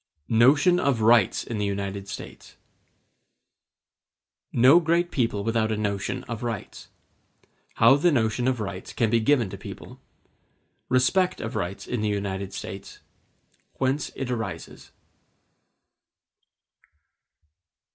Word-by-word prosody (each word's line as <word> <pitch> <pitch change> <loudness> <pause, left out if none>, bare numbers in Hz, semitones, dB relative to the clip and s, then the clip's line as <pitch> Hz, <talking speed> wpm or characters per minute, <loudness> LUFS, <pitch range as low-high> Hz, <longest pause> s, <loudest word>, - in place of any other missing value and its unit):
Notion 145 +10 +4
Of 140 -9 0
Rights 110 -2 +4
In 115 -3 -5
The 105 - 0
United 100 0 -4
States 100 - -10 2.0
No 130 +8 +6
great 170 +1 +1
people 115 -6 -1
without 110 0 0
a 110 - -1
notion 100 -2 -2
of 115 -2 -6
rights—How 120 +3 -2
the 175 +4 +3
notion 120 -1 0
of 130 -2 0
rights 100 -3 -6
can 115 -2 0
be 115 - +3
given 120 0 +2
to 100 - -8
people—Respect 180 +9 -3
of 115 - -5
rights 95 -2 -4
in 125 -3 -3
the 105 - 0
United 100 -1 -3
States—Whence 130 +7 -6
it 130 -2 -4
arises. 100 -9 -6
115 Hz, 105 wpm, -25 LUFS, 100-130 Hz, 2.0 s, No